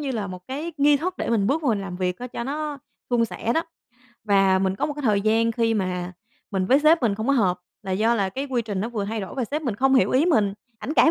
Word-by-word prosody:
như 280 -2 -3
là 210 -4 -2
một 185 -1 -7
cái 300 +6 -4
nghi 285 0 +5
thức 360 +5 -3
để - - -3
mình 205 -4 +2
bước 310 +6 +1
vô 275 - +1
mình 210 -3 +1
làm 185 -2 -6
việc 180 -1 -2
á 250 - -5
cho 235 - -5
nó 295 +1 -3 0.3
suôn 235 -1 +3
sẻ 230 +1 -2
đó. 325 - +2 0.6
Và 195 -2 +4
mình 190 0 0
có - - 0
một 295 - -3
cái 295 - -6
thời 210 -4 +2
gian 225 +2 +2
khi 225 -1 +1
mà 180 -2 -2 0.4
mình 190 -2 -1
với 270 +6 +5
sếp 310 -1 +4
mình 220 -4 +2
không 220 +4 -4
có 280 - +3
hợp 190 -8 +2 0.2
là 190 - -6
do 220 +5 +2
là 200 -4 0
cái 270 +8 -4
quy 245 -3 0
trình 205 -4 -3
nó 225 - -2
vừa 215 -4 -3
thay 220 +1 -3
đổi 190 - -7
và 260 - -1
sếp 300 +7 -3
mình 240 -7 -2
không 270 +4 +2
hiểu 255 - +4
ý 270 +5 +3
mình, 205 - +2 0.2
ảnh 300 - -4
cãi 325 - +6
230 Hz, 290 wpm, -24 LUFS, 200-275 Hz, 0.6 s, cãi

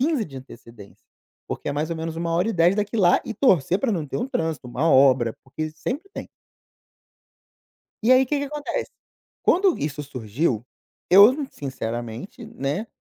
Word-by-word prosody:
15 280 -5 +1
de 135 -6 -11
antecedência, 115 -5 -13 0.4
porque - - -4
é - - -1
mais 155 +3 -2
ou 165 - -2
menos 160 0 -4
uma 165 0 -3
1 165 - +1
hora 185 +6 +1
e - - 0
10 175 +3 +3
daqui 210 +2 -1
lá 180 -4 +4
e 225 - -5
torcer 185 - +2
pra 265 - 0
não 165 -7 -2
ter - - -4
um 245 +3 -2
trânsito, 160 - -3
uma 140 +7 0
obra, 130 -5 +4
porque 155 +4 -5
sempre 285 - -5
tem. - - -7 1.7
E 245 +3 +5
aí, 260 +1 +6
que 290 +3 -1
que 285 - -2
acontece? 300 - -4 0.5
Quando 375 -1 +3
isso 150 0 -3
surgiu, 125 -1 -2 0.5
eu, 205 +7 +8 0.2
sinceramente, 120 - -6
né, 200 0 -3
165 Hz, 175 wpm, -23 LUFS, -, 1.7 s, eu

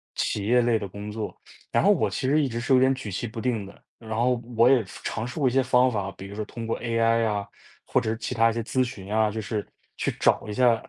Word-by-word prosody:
企 100 - -1
业 125 +3 +4
类 120 -1 +2
的 105 - -4
工 100 +2 -8
作。 110 -1 -4 0.4
然 - - +3
后 - - +6
我 - - +2
其 - - -2
实 150 +2 +3
一 - - +1
直 115 -1 -3
是 120 +3 +1
有 130 - +7
点 130 +1 +4
举 130 -5 -6
棋 105 - -3
不 115 +1 -6
定 115 -4 -1
的， 100 - -14 0.2
然 110 -1 -7
后 120 +1 +1 0.2
我 115 +2 +6
也 130 -5 +5
尝 110 +4 -5
试 125 +6 -6
过 135 - +3
一 - - -5
些 135 0 +3
方 130 0 +4
法， 100 -5 -2
比 95 - -8
如 100 - -9
说 110 - -3
通 115 +1 -7
过 115 - -1
AI 115 -1 +2
啊， 100 -2 -1 0.4
或 - - +1
者 - - -2
是 110 - -1
其 115 +3 -4
他 115 0 +4
一 - - -1
些 115 - -2
咨 130 +3 0
询 105 -5 -6
啊 110 -1 +3
就 110 - -4
是 105 -1 -3 0.3
去 - - -1
找 - - +3
一 - - -3
下， 120 +1 +4
115 Hz, 310 characters per minute, -26 LUFS, 105-125 Hz, 0.4 s, 有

